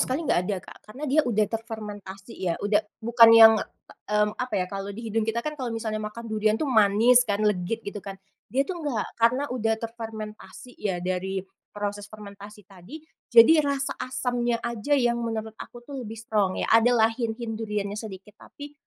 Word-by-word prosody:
sekali 275 +6 -1
nggak 175 - +2
ada 200 - 0
Kak, - - -13
karena 260 +8 -7
dia 290 +3 +4
udah 215 -2 +2
terfermentasi 210 -2 -7
ya. 175 -3 -1
Udah 205 0 +3 0.2
bukan 230 0 +7
yang, 225 0 +10 0.6
mmm, 210 0 +2
apa 250 0 -3
ya, 185 - +1
kalau 195 +1 -6
di 230 - -7
hidung 225 +1 +1
kita 235 +1 -2
kan 305 - -3
kalau 260 -4 -4
misalnya 220 -1 -3
makan 215 +2 -7
durian 215 0 +1
tuh 305 - -2
manis 225 +1 +5
kan 205 +1 0
legit 210 +2 -1
gitu 200 0 -6
kan, 195 +1 -8 0.3
dia 265 +6 +1
tuh 350 +3 -6
nggak. 270 -9 -2
Karena 250 +5 +3
udah 225 -3 0
terfermentasi 225 +1 -8
ya 195 -4 -1
dari 190 +1 -2 0.3
proses 205 0 -4
fermentasi 210 0 -12
tadi, 195 - -12 0.3
jadi 235 +8 +8
rasa 280 -1 -1
asamnya 245 -2 -1
aja 235 +4 -3
yang 240 -3 +1
menurut 225 -1 -4
aku 240 0 -10
tuh 275 0 -7
lebih 225 -2 -7
strong 210 -4 0
ya. - - -1
Ada 230 +2 +5
lah 220 0 +4
hint-hint 225 -1 -4
duriannya 210 -2 -3
sedikit, 210 -2 -9
tapi, 290 0 -11
220 Hz, 185 wpm, -25 LUFS, 205-240 Hz, 0.6 s, yang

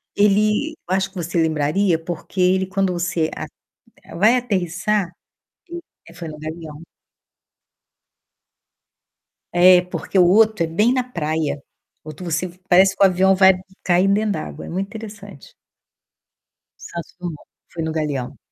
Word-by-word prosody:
ele 210 +7 +2 0.2
eu 185 - +2
acho 190 0 0
que 195 - -28
você 170 -1 -1
lembraria, 160 +4 +1
porque 170 +3 -7
ele 185 +1 +3
quando 190 0 -1
você 170 -2 -1
a - - -6 0.7
vai 220 +7 +5
aterrissar 195 -4 -1 0.6
hum, 345 0 -6 0.4
foi 170 -2 -7
no 155 -1 -9
Galeão. 155 -1 -8 2.7
É, 180 +1 +7
porque 180 +2 -4
o 180 - +6
outro 215 +1 +4
é - - -6
bem 210 +10 +2
na 255 -1 +1
praia, 155 - -3 0.4
o 155 - -10
outro 155 +4 -9
você 175 +2 -2 0.2
parece 185 +2 +5
que - - +2
o - - +9
avião 190 +1 +3
vai 190 0 +6 0.3
cair 180 +1 +3
dentro 210 +2 +1
d'água, - - -6
é - - -9
muito 190 +3 -3
interessante. 205 -6 -11 1.3
Santos 170 -2 -8
Dumont, 170 -4 -7 0.3
foi 165 - -4
no 160 - -2
Galeão. 150 -5 -3
180 Hz, 145 wpm, -21 LUFS, 165-200 Hz, 2.7 s, o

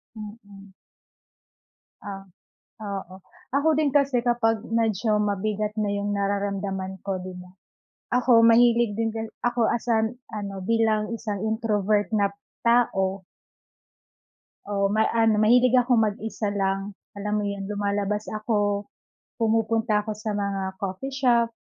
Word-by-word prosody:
Mm. 205 -2 -11 1.3
Ah, 195 -1 -7 0.7
oo. 185 -1 -12 0.4
Ako 285 +3 +2
din 295 -3 +2
kasi 275 -4 +2
kapag 230 -2 +1
medyo 225 -2 +1
mabigat 210 +1 -1
na 210 -1 0
'yong 205 0 -2
nararamdaman 200 -1 -2
ko, 195 -2 -2
'di 185 0 -7
ba. 180 - -14 0.7
Ako 230 -2 +5
mahilig 235 -1 +4
din 225 - +1
kasi 225 0 -4 0.2
ako 240 0 -3
as, 235 0 -3
ah, 220 0 +3 0.3
ano, 200 -1 -5
bilang 220 0 +1
isang 210 -3 -4
introvert 210 -2 +1
na 205 -2 +3 0.4
tao. 195 -5 +2 1.5
Oo, 200 -1 +2
ma 220 - +4
ano, 225 -2 +3
mahilig 245 +3 +5
akong 245 -2 +4
mag-isa 215 +1 -4
lang, 195 0 -1 0.2
alam 210 +1 -2
mo 210 - 0
'yon. 200 -1 -4
Lumalabas 205 0 -2
ako, 205 -2 -1 0.5
pumupunta 225 -1 +1
ako 215 - -3
sa 215 0 -4
mga 195 -2 -2
coffee 200 +9 -5
shop, 240 -4 +3
210 Hz, 130 wpm, -25 LUFS, 200-230 Hz, 1.5 s, Ako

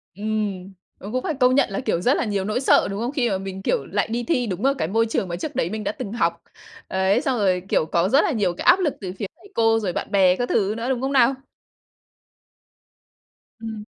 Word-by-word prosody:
Ừm, 205 -2 -3 0.2
ờ, 200 - -9
cũng 255 +1 -2
phải 335 - -1
công 255 -2 +3
nhận 280 - +3
là, - - -3
kiểu, 215 -9 -1
rất 255 +7 +3
là - - 0
nhiều 200 -3 -1
nỗi 215 +4 -1
sợ, 265 - +4
đúng 195 - -4
không? 240 - -2
Khi 260 -5 0
mà 195 - 0
mình, 195 0 -6
kiểu, 485 - 0
lại - - -1
đi 235 +2 -2
thi 250 -5 0
đúng 190 +3 -3
ở 275 - +4
cái - - -1
môi 225 +5 +2
trường 220 -4 -2
mà 170 - -4
trước 175 - -6
đấy 165 - 0
mình 215 +2 -4
đã - - -1
từng 205 - -7
học. 170 -6 0 0.5
Ấy, 190 +5 +1
xong 265 -5 0
rồi, 185 -4 +1
kiểu, 155 - +2
có 170 +4 +1
rất 275 +5 +5
là - - +1
nhiều 200 -8 0
cái - - -7
áp 375 - +6
lực 320 -7 0
từ 185 -2 -5
phía - - -2
thầy 400 - -18
cô, 225 -1 +3
rồi 195 -5 -2
bạn - - -4
bè 185 -3 +4
các 245 +3 -3
thứ 205 -1 +1
nữa, 235 +3 -3
đúng 255 -2 -1
không 270 +1 -1
nào? 265 0 +4 2.2
Ừm. 220 -2 -6
215 Hz, 255 wpm, -23 LUFS, 190-250 Hz, 2.2 s, áp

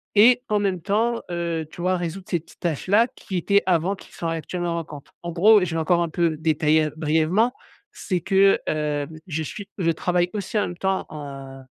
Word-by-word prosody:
Et 240 +4 +6
en 210 -1 +2
même 190 -3 -1
temps, 225 +6 0
heu, 170 -2 -2
tu - - -13
vois, 185 +1 +2
résoudre 175 +2 -5
ces 175 - +1
petites - - -20
tâches 165 -2 -2
là 215 +5 +5
qui 190 - -5
étaient 200 +3 +2
avant, 180 +1 +1
qui - - -16
sont 170 - -4
actuellement 170 +1 -3
manquantes. 155 -4 -7
En 170 - -4
gros, 205 +4 +6
je 170 -2 -2
vais - - 0
encore 170 +2 +2
un 170 - -3
peu 165 0 +1
détailler 155 0 +2
brièvement, 160 +9 +2 0.4
c'est 185 -4 -2
que, 195 +2 +4
hem, 150 0 -2
je 160 -2 -2
suis 200 +6 -7
je 170 -4 +2
travaille 175 +2 0
aussi 210 +1 -3
en - - +2
même 175 - -5
temps, 190 +1 -1
en, 135 -3 -8
heu, - - -15
175 Hz, 210 wpm, -23 LUFS, 160-195 Hz, 0.4 s, Et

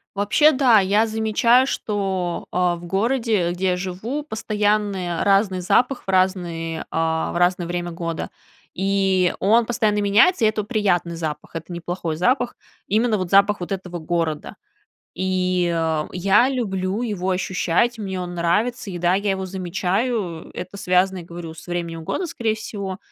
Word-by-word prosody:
Вообще, 215 +10 +4
да, 255 -5 +5
я 205 +3 +2
замечаю, 225 +3 +3
что, 190 -7 -2
э, 180 -1 +2
в 175 - -10
городе, 215 -1 +1
где 180 +2 -3
я - - +1
живу, 195 +11 -4
постоянные 210 - -1
разный 195 -1 +3
запах 250 +8 +1
в - - -32
разный 175 -4 0
а, 160 0 -1
в - - -7
разное 175 0 +2
время 175 0 -3
года. 165 -1 -4 0.4
И 190 -1 +1
он 225 +4 +4
постоянно 215 -3 +1
меняется, 215 - +4
и - - +6
это 215 0 0
приятный 195 -6 0
запах. 160 0 -5
Это 165 +2 -8
неплохой 170 -1 -4
запах. 245 - +1 0.3
Именно 220 +1 +2
вот 185 -2 -3
запах 200 +2 +4
вот 175 +2 -4
этого 180 -2 -5
города. 160 -2 -2 0.6
И, 185 -1 0
э, 160 -2 0
я 200 +7 +4
люблю 200 -4 -2
его 195 -5 -2
ощущать, 185 +5 0
мне 190 -3 -4
он 175 -1 -5
нравится. 210 +8 0
И 180 - -5
да, 175 +1 +2
я 200 +1 +1
его 190 0 -2
замечаю, 190 +1 -2
это 185 +3 -7
связано, 185 0 +2
я 170 - -10
говорю, 170 -1 -8
с 160 +2 -13
временем 170 -2 -4
года, 365 - -2
скорее 230 -9 -1
всего. 200 -3 -5
190 Hz, 160 wpm, -22 LUFS, 175-215 Hz, 0.6 s, и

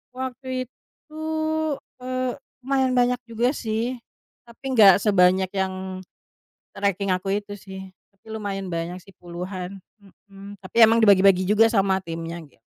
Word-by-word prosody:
Waktu 260 0 -4
itu, 310 +5 -15 0.8
eee, 255 0 -2 0.3
lumayan 265 -1 +1
banyak 245 0 +2
juga 230 +2 0
sih, 235 -1 -3 0.5
tapi 260 +3 -6
gak 200 -5 +8
sebanyak 185 -2 +4
yang, 190 -1 -2 1.0
treking 200 -1 -1
aku 185 +2 0
itu 205 0 -9
sih. 190 -1 -10 0.2
Tapi 195 - -37
lumayan 200 -3 -4
banyak 170 +2 -4
sih 195 - -17
puluhan, 180 +2 -7 0.2
mhm, 200 0 -14
tapi 185 +2 -12
emang 225 +1 +4
dibagi-bagi 195 -3 +6
juga 215 +2 +5
sama 195 -4 +2
timnya, 165 -1 -6
gitu. 130 -5 -28
200 Hz, 130 wpm, -24 LUFS, 185-235 Hz, 1.0 s, gak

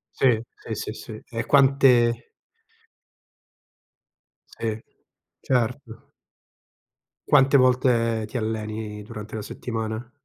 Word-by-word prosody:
Sì, 120 -4 +3
sì, 110 - -7
sì, 105 - -4
sì. 110 0 -9
E 115 -1 -4
quante 130 -4 +4 2.3
Sì, 110 -1 -3 0.6
certo. 125 -1 -2 1.2
Quante 140 -1 +5
volte 120 -3 +2
ti 125 - -5
alleni 110 -1 -4
durante 105 +1 -8
la 110 - -4
settimana? 110 +1 -5
115 Hz, 90 wpm, -24 LUFS, 110-125 Hz, 2.3 s, Quante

